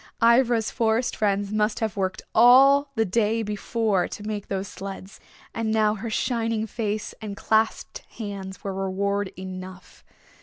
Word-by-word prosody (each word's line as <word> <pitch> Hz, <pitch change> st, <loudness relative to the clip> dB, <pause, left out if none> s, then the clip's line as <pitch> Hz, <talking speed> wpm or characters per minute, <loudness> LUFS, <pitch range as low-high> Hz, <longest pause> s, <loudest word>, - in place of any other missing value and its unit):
Ivra's 235 Hz, -1 st, +3 dB
Forest 230 Hz, +1 st, 0 dB
Friends 200 Hz, -1 st, 0 dB
must 215 Hz, 0 st, 0 dB
have 220 Hz, -2 st, -2 dB
worked 190 Hz, -1 st, -2 dB
all 275 Hz, +4 st, +6 dB
the 225 Hz, -1 st, +2 dB
day 220 Hz, +3 st, +1 dB
before 210 Hz, -1 st, 0 dB
to 205 Hz, -, -8 dB
make 210 Hz, -1 st, -4 dB
those 195 Hz, 0 st, -3 dB
sleds 195 Hz, 0 st, -8 dB, 0.3 s
and 225 Hz, -1 st, -2 dB
now 215 Hz, -1 st, +3 dB
her 220 Hz, +2 st, -5 dB
shining 225 Hz, -1 st, -1 dB
face 215 Hz, -1 st, -3 dB
and 205 Hz, -2 st, -6 dB
clasped 220 Hz, 0 st, 0 dB, 0.2 s
hands 200 Hz, -4 st, -6 dB
were 195 Hz, -2 st, -3 dB
reward 195 Hz, +1 st, -1 dB
enough. 185 Hz, 0 st, -9 dB
215 Hz, 145 wpm, -25 LUFS, 195-225 Hz, 0.3 s, all